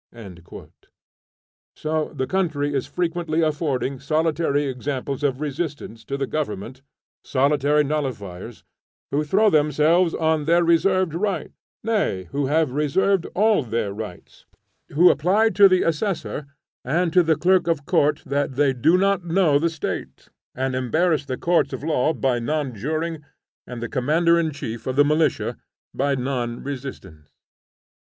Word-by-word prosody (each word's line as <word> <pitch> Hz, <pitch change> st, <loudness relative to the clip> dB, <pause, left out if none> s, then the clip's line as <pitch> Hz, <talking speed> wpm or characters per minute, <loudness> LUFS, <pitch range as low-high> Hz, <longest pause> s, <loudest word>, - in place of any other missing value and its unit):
So 155 Hz, 0 st, -2 dB
the 130 Hz, -3 st, -3 dB
country 155 Hz, -5 st, -1 dB
is 135 Hz, -2 st, -1 dB
frequently 170 Hz, -2 st, -1 dB
affording 145 Hz, -4 st, -1 dB
solitary 155 Hz, 0 st, 0 dB
examples 135 Hz, +1 st, -4 dB
of 135 Hz, -3 st, 0 dB
resistance 145 Hz, -6 st, -5 dB
to 140 Hz, -, -3 dB
the 140 Hz, -, -1 dB
government, 130 Hz, -4 st, -4 dB, 0.4 s
solitary 145 Hz, +2 st, +2 dB
nullifiers, 120 Hz, -9 st, -4 dB, 0.5 s
who 145 Hz, +2 st, +1 dB
throw 200 Hz, +7 st, +3 dB
themselves 155 Hz, +3 st, +3 dB
on 160 Hz, -2 st, 0 dB
their 170 Hz, +2 st, +3 dB
reserved 175 Hz, +1 st, +2 dB
rights; 195 Hz, +3 st, -2 dB, 0.3 s
nay, 210 Hz, -, 0 dB
who 140 Hz, -1 st, -1 dB
have 155 Hz, -1 st, +1 dB
reserved 165 Hz, +6 st, +1 dB
all 215 Hz, 0 st, +3 dB
their 115 Hz, -5 st, -2 dB
rights; 105 Hz, -4 st, -9 dB, 0.4 s
who 175 Hz, +5 st, +5 dB
reply 210 Hz, +7 st, +3 dB
to 195 Hz, +1 st, +6 dB
the 185 Hz, -1 st, +3 dB
assessor 165 Hz, -3 st, -2 dB, 0.4 s
and 165 Hz, +6 st, 0 dB
to 180 Hz, -, +6 dB
the 160 Hz, -2 st, +2 dB
clerk 180 Hz, +2 st, +2 dB
of 160 Hz, -4 st, 0 dB
court 150 Hz, +1 st, +1 dB
that 140 Hz, 0 st, -1 dB
they 135 Hz, 0 st, +2 dB
do 155 Hz, +8 st, +3 dB
not 195 Hz, -1 st, +1 dB
know 170 Hz, -4 st, +2 dB
the 170 Hz, +2 st, +1 dB
State, 160 Hz, -2 st, -6 dB, 0.3 s
and 130 Hz, 0 st, -2 dB
embarrass 145 Hz, +4 st, +1 dB
the 130 Hz, -2 st, -4 dB
courts 175 Hz, 0 st, +1 dB
of -, -, -6 dB
law 155 Hz, -2 st, +1 dB
by 130 Hz, -6 st, 0 dB
non 145 Hz, +1 st, -2 dB
juring 155 Hz, +7 st, -3 dB, 0.4 s
and 120 Hz, -2 st, -7 dB
the -, -, -2 dB
commander 160 Hz, +7 st, +2 dB
in 165 Hz, -1 st, 0 dB
chief 115 Hz, -6 st, -7 dB
of 130 Hz, -, -2 dB
the 145 Hz, +1 st, +5 dB
militia 150 Hz, -1 st, +1 dB, 0.4 s
by 140 Hz, +1 st, 0 dB
non 125 Hz, -2 st, -3 dB
resistance. 125 Hz, -, -8 dB
150 Hz, 145 wpm, -22 LUFS, 135-170 Hz, 0.5 s, to